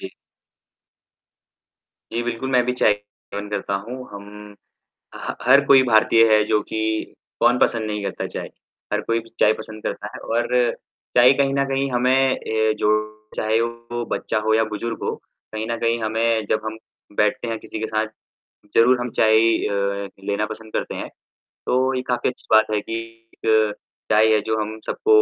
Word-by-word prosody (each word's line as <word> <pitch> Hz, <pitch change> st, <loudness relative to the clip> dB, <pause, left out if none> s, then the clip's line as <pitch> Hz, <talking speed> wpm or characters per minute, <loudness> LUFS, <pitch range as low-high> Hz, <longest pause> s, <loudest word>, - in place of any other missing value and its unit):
जी। -, -, -7 dB, 2.0 s
जी, 120 Hz, -, -1 dB
बिल्कुल, 120 Hz, +2 st, -3 dB
मैं 125 Hz, -1 st, +4 dB
भी 125 Hz, -, 0 dB
चाय 125 Hz, -4 st, +3 dB
सेवन 105 Hz, 0 st, -10 dB
करता 100 Hz, -1 st, -2 dB
हूँ, 125 Hz, +3 st, -6 dB, 0.2 s
हम 105 Hz, +1 st, -10 dB, 0.6 s
अ, -, -, -8 dB
ह -, -, -4 dB
हर 135 Hz, +3 st, +6 dB
कोई 135 Hz, -1 st, +7 dB
भारतीय 115 Hz, -1 st, +5 dB
है, 105 Hz, 0 st, +6 dB
जो 105 Hz, 0 st, +2 dB
कि 110 Hz, -, -4 dB, 0.6 s
कौन 120 Hz, +1 st, +4 dB
पसंद 115 Hz, -3 st, +1 dB
नहीं 105 Hz, -1 st, -3 dB
करता 100 Hz, -, -3 dB
चाय? -, -, -6 dB, 0.4 s
हर -, -, +1 dB
कोई 115 Hz, 0 st, +1 dB
प 115 Hz, -, -16 dB
चाय 105 Hz, -, +6 dB
पसंद 110 Hz, 0 st, -9 dB
करता -, -, -4 dB
है, -, -, -6 dB
और 120 Hz, +2 st, -1 dB, 0.6 s
चाय 125 Hz, +2 st, +8 dB
कहीं 135 Hz, -1 st, +2 dB
न 140 Hz, 0 st, +2 dB
कहीं 135 Hz, 0 st, 0 dB
हमें 125 Hz, 0 st, +1 dB
ए 110 Hz, -5 st, +2 dB
जो 105 Hz, -, +2 dB, 0.5 s
चाहे 110 Hz, +1 st, +1 dB
वो 115 Hz, 0 st, -4 dB
बच्चा 110 Hz, -, -1 dB
हो 110 Hz, -, +4 dB
या 110 Hz, 0 st, +3 dB
बुज़ुर्ग 110 Hz, +2 st, -5 dB
हो, -, -, -1 dB, 0.4 s
कहीं 110 Hz, 0 st, -3 dB
न 115 Hz, -, 0 dB
कहीं 115 Hz, 0 st, +1 dB
हमें 110 Hz, 0 st, +1 dB
जब 110 Hz, -, +2 dB
हम 110 Hz, 0 st, -5 dB, 0.4 s
बैठते 115 Hz, +3 st, +1 dB
हैं 115 Hz, -, -2 dB
किसी 110 Hz, -, -8 dB
के 110 Hz, -, -1 dB
साथ, 110 Hz, 0 st, -1 dB, 0.7 s
ज़रूर 125 Hz, +2 st, +5 dB
हम 125 Hz, -, -3 dB
चाय 110 Hz, 0 st, +5 dB, 0.3 s
अ, 100 Hz, 0 st, -1 dB, 0.2 s
लेना 100 Hz, +1 st, 0 dB
पसंद 110 Hz, 0 st, -9 dB
करते -, -, -2 dB
हैं। -, -, -5 dB, 0.6 s
तो 130 Hz, +1 st, +2 dB
ये 130 Hz, -, -1 dB
काफ़ी 120 Hz, 0 st, +1 dB
अच्छी 125 Hz, -, -11 dB
बात 110 Hz, 0 st, +4 dB
है 105 Hz, -, +1 dB
कि 115 Hz, -, -7 dB, 0.4 s
एक 110 Hz, -1 st, +2 dB, 0.4 s
चाय 110 Hz, +1 st, +5 dB
है, 105 Hz, -, +3 dB
जो 110 Hz, +1 st, -1 dB
हम 110 Hz, +1 st, -5 dB
सबको 430 Hz, 0 st, +4 dB
110 Hz, 185 wpm, -22 LUFS, 110-120 Hz, 2.0 s, चाय